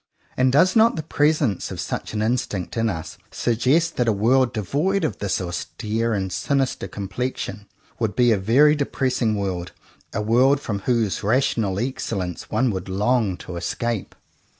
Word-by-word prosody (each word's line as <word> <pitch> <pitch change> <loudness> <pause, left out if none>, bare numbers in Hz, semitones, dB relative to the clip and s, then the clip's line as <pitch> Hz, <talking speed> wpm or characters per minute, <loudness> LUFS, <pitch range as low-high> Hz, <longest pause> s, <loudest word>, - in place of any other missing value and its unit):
And 130 0 +3
does 180 - +4
not 225 +1 +5
the 160 - -3
presence 150 - +1
of - - -6
such - - -4
an 105 - 0
instinct 110 -5 -2
in 115 -1 +1
us 80 -5 -6
suggest 135 +9 +1
that 125 - +1
a - - +5
world 120 +5 +3
devoid 145 - 0
of 155 - -2
this 100 -2 -1
austere 110 +5 -2
and 95 -2 -2
sinister 135 -2 -1
complexion 105 +1 -4 0.3
would 110 -3 -1
be 120 -1 +4
a 110 - +3
very 130 +10 +5
de 145 -2 -1
pressing 125 -4 0
world, 95 -3 -3 0.4
a - - -3
world 130 +6 +4
from 105 -8 -3
whose 115 -5 +1
rational 110 -3 +1
excellence 100 -8 -3
one 130 -2 +1
would 95 -1 -5
long 105 0 +1
to 90 - -6
escape? 115 +5 -3
115 Hz, 165 wpm, -23 LUFS, 100-130 Hz, 0.4 s, not